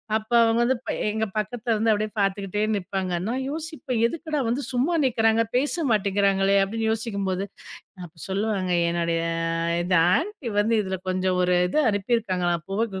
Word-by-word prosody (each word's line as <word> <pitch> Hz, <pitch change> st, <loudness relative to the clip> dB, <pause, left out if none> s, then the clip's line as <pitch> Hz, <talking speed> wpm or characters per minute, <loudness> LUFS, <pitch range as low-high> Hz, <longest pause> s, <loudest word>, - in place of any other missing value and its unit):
அப்ப 220 Hz, +1 st, -3 dB
அவங்க 225 Hz, 0 st, +3 dB
வந்து 255 Hz, +2 st, +2 dB
ப -, -, -6 dB, 0.2 s
எங்க 220 Hz, +1 st, -1 dB
பக்கத்துல 230 Hz, +2 st, -1 dB
வந்து 215 Hz, -1 st, +1 dB
பாத்துக்கிட்டே 200 Hz, +1 st, 0 dB
நிப்பாங்க. 190 Hz, -1 st, -3 dB
நான் 260 Hz, +3 st, -2 dB
யோசிப்பேன். 305 Hz, -6 st, -4 dB
எதுக்குடா! 310 Hz, +2 st, -3 dB
வந்து 240 Hz, +5 st, 0 dB
சும்மா 260 Hz, +8 st, +1 dB
நிக்கறாங்க, 225 Hz, -3 st, +3 dB
பேச 295 Hz, +6 st, +1 dB
மாட்டேங்கறாங்களே! 200 Hz, -1 st, +2 dB
அப்படின்னு 220 Hz, +3 st, -2 dB
யோசிக்கும்போது, 200 Hz, -4 st, -2 dB, 0.6 s
அப்ப 160 Hz, -, -13 dB
சொல்லுவாங்க. 195 Hz, -2 st, -1 dB, 0.2 s
"என்னோடய 170 Hz, -1 st, 0 dB, 0.6 s
இது 180 Hz, +1 st, 0 dB, 0.2 s
ஆன்டி 330 Hz, -, -4 dB
வந்து 220 Hz, +3 st, +2 dB
இதுல 190 Hz, -1 st, -3 dB
கொஞ்சம் 185 Hz, 0 st, 0 dB
ஒரு 180 Hz, 0 st, +2 dB
இது 245 Hz, -, 0 dB
அனுப்பி 205 Hz, +4 st, +1 dB
இருக்காங்களாம். 180 Hz, -6 st, -1 dB
புகைகு 200 Hz, -1 st, -2 dB
210 Hz, 150 wpm, -24 LUFS, 190-235 Hz, 0.6 s, அவங்க